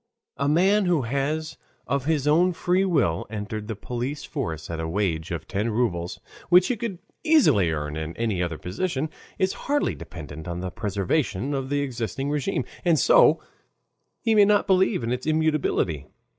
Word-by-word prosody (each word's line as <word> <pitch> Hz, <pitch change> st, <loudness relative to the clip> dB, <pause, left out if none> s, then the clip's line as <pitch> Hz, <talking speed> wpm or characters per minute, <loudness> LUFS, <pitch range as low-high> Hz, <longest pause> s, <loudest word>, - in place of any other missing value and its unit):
A 140 Hz, +1 st, +1 dB
man 190 Hz, +6 st, +4 dB
who 170 Hz, -6 st, +2 dB
has 150 Hz, +5 st, -2 dB, 0.3 s
of 140 Hz, -1 st, -1 dB
his 150 Hz, -2 st, +1 dB
own 175 Hz, +4 st, +4 dB
free 180 Hz, +3 st, +1 dB
will 120 Hz, -, +1 dB
entered 105 Hz, 0 st, -5 dB
the 110 Hz, -, -3 dB
police 125 Hz, +7 st, -4 dB
force 80 Hz, -, -4 dB
at 85 Hz, -1 st, -5 dB
a 80 Hz, -, -2 dB
wage 85 Hz, -4 st, -1 dB
of 85 Hz, -, -5 dB
ten 110 Hz, +1 st, -1 dB
rubles, 90 Hz, -7 st, -1 dB, 0.3 s
which 180 Hz, +1 st, +6 dB
he 250 Hz, -, +1 dB
could 220 Hz, -4 st, -4 dB, 0.3 s
easily 295 Hz, -, +4 dB
earn 75 Hz, -1 st, -3 dB
in 80 Hz, +1 st, -5 dB
any 110 Hz, -6 st, 0 dB
other 85 Hz, -3 st, -2 dB
position, 145 Hz, -, -3 dB, 0.3 s
is 190 Hz, -2 st, +1 dB, 0.2 s
hardly 290 Hz, 0 st, +2 dB
dependent 80 Hz, -1 st, -9 dB
on 85 Hz, 0 st, -4 dB
the 90 Hz, 0 st, -4 dB
preservation 105 Hz, -, -1 dB
of 135 Hz, -1 st, -2 dB
the 145 Hz, 0 st, +1 dB
existing 135 Hz, +1 st, -3 dB
RÉGIME, 140 Hz, -3 st, -1 dB, 0.2 s
and 170 Hz, -3 st, +4 dB
so -, -, +5 dB, 0.8 s
he 225 Hz, -3 st, +3 dB
may 210 Hz, -2 st, +7 dB
not 205 Hz, 0 st, +3 dB
believe 190 Hz, -, +2 dB
in 115 Hz, -, -2 dB
its 125 Hz, +3 st, -3 dB
immutability. 155 Hz, -, +1 dB
130 Hz, 170 wpm, -25 LUFS, -, 0.8 s, may